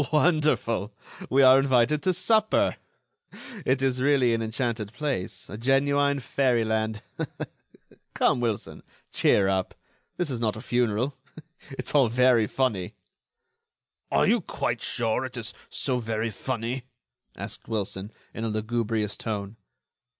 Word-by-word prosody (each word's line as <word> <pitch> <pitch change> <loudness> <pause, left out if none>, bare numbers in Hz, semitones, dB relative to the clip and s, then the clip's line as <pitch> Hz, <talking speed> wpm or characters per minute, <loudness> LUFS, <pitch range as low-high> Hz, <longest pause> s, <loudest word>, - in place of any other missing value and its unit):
"Wonderful! 150 - +2 0.4
we 135 +1 +4
are 130 +1 +8
invited 135 +2 +3
to 185 - +2
supper. 215 +4 +3 0.9
It 130 +1 +2
is 130 -1 +1
really 130 -3 +3
an 115 - 0
enchanted 110 -1 -2
place, 140 -12 -3
a 105 - -8
genuine 140 +3 +2
fairy 125 -3 +1
land. 110 -1 -1 1.1
Come, - - +3
Wilson, 115 -4 -3 0.3
cheer 100 -2 +3
up! 95 -1 -1 0.4
this 175 -5 -1
is 125 - -3
not 110 -2 0
a - - -7
funeral. 120 +2 0 0.5
It's 135 - -5
all 140 -4 +5
very 120 -2 +4
funny." 110 -9 -1 1.2
"Are - - +4
you - - +3
quite - - -2
sure 115 +1 0
it 130 -1 -6
is 115 -1 -5 0.2
so 130 -2 -1
very 115 -1 -2
funny?" 120 +3 -3 0.5
asked - - -7
Wilson, 100 -2 -3 0.2
in 110 - -5
a 115 - -1
lugubrious 110 -1 -1
tone. 105 -1 -4
120 Hz, 130 wpm, -26 LUFS, 110-135 Hz, 1.2 s, are